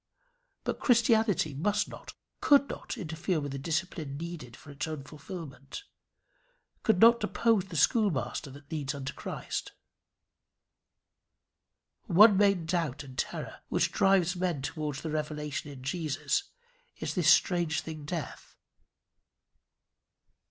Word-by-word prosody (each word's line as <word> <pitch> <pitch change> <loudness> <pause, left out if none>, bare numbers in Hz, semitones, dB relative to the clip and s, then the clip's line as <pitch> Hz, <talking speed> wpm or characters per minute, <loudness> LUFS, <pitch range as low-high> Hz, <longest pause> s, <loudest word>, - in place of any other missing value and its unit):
But - - -2
Christianity 225 - +3
must 205 +9 0
not, - - -10 0.2
could 280 -1 +5
not - - -6
interfere 165 -2 -2
with 145 -1 -4
the 135 - -4
discipline 155 -2 -3
needful 155 -7 -7
for 145 - -12
its 145 +3 -4
own 155 -3 -5
fulfilment, 150 - -9 1.0
could 220 -6 +2
not 235 +2 +7
depose 225 -5 +2
the 185 - -9
schoolmaster 150 - +1
that 145 +3 -14
leads 145 -3 -2
unto 135 -1 -5
Christ. - - -5 2.3
One 205 +4 +7
main 200 -4 +3
doubt 165 -5 -1
and 130 -2 -11
terror - - -4
which - - +1
drives 190 -2 +3
men 175 -6 -1
towards 150 -1 -4
the 160 - -3
revelation 150 -1 -3
in 130 -2 -11
Jesus, 160 - -1 0.5
is - - -3
this 175 -4 +3
strange 170 -4 +3
thing 155 -2 -7
Death. 160 +1 -6
160 Hz, 125 wpm, -30 LUFS, 145-190 Hz, 2.3 s, not